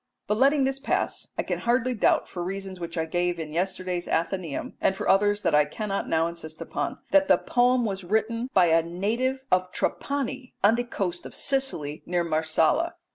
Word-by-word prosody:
But 210 Hz, +1 st, 0 dB
letting 275 Hz, +1 st, +4 dB
this 270 Hz, 0 st, 0 dB
pass, 280 Hz, -, -1 dB
I -, -, 0 dB
can -, -, -2 dB
hardly 245 Hz, +1 st, +1 dB
doubt, 215 Hz, -, +2 dB
for 175 Hz, -, -5 dB
reasons 190 Hz, 0 st, -5 dB
which 170 Hz, 0 st, -6 dB
I 160 Hz, -, 0 dB
gave 175 Hz, +1 st, -1 dB
in 155 Hz, -2 st, -6 dB
yesterday's 180 Hz, 0 st, -2 dB
Athenaeum, 170 Hz, -3 st, -2 dB
and 190 Hz, -, +2 dB
for -, -, -3 dB
others 205 Hz, +1 st, +3 dB
that 170 Hz, -4 st, +1 dB
I 150 Hz, 0 st, +6 dB
cannot 195 Hz, +6 st, -3 dB
now 160 Hz, 0 st, +2 dB
insist 165 Hz, -2 st, -6 dB
upon, -, -, -3 dB
that 290 Hz, 0 st, +5 dB
the -, -, +6 dB
poem 245 Hz, 0 st, +2 dB
was 195 Hz, -2 st, -3 dB
written 220 Hz, +5 st, 0 dB
by 185 Hz, -6 st, +5 dB
a 165 Hz, 0 st, +4 dB
native 225 Hz, +10 st, -1 dB
of 185 Hz, 0 st, +2 dB
Trapani 270 Hz, -2 st, -2 dB
on 205 Hz, +2 st, +6 dB
the 240 Hz, +1 st, -1 dB
coast 180 Hz, -7 st, -3 dB
of -, -, -11 dB
Sicily, 265 Hz, -, -1 dB
near 175 Hz, 0 st, +1 dB
Marsala. 160 Hz, -, +1 dB
195 Hz, 190 wpm, -26 LUFS, 170-245 Hz, -, I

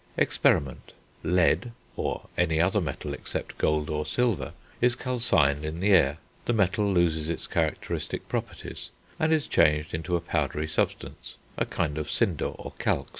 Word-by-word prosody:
Experiment. 65 Hz, -2 st, +1 dB, 0.3 s
Lead, 90 Hz, +5 st, +2 dB, 0.2 s
or -, -, -3 dB
any 80 Hz, -3 st, +2 dB
other 95 Hz, +5 st, +3 dB
metal 75 Hz, -6 st, -4 dB
except -, -, -5 dB
gold 75 Hz, -1 st, +1 dB
or 75 Hz, 0 st, -1 dB
silver, 115 Hz, +6 st, 0 dB, 0.3 s
is 125 Hz, 0 st, +4 dB
calcined 95 Hz, -, +2 dB
in 80 Hz, +2 st, -4 dB
the 100 Hz, +3 st, +2 dB
air; 75 Hz, -6 st, +5 dB, 0.3 s
the 120 Hz, -, +1 dB
metal 100 Hz, -1 st, +2 dB
loses 80 Hz, -3 st, +2 dB
its 85 Hz, -, -2 dB
characteristic -, -, -2 dB
properties, -, -, -4 dB, 0.3 s
and 160 Hz, 0 st, +2 dB
is 155 Hz, -2 st, +2 dB
changed 75 Hz, 0 st, +3 dB
into 80 Hz, +2 st, -1 dB
a -, -, +2 dB
powdery 80 Hz, -2 st, -1 dB
substance, 80 Hz, -, -3 dB, 0.2 s
a -, -, -1 dB
kind 75 Hz, -2 st, -1 dB
of 75 Hz, 0 st, -4 dB
cinder 95 Hz, -7 st, +1 dB
or -, -, -6 dB
calx. -, -, 0 dB
85 Hz, 155 wpm, -27 LUFS, 75-100 Hz, 0.3 s, air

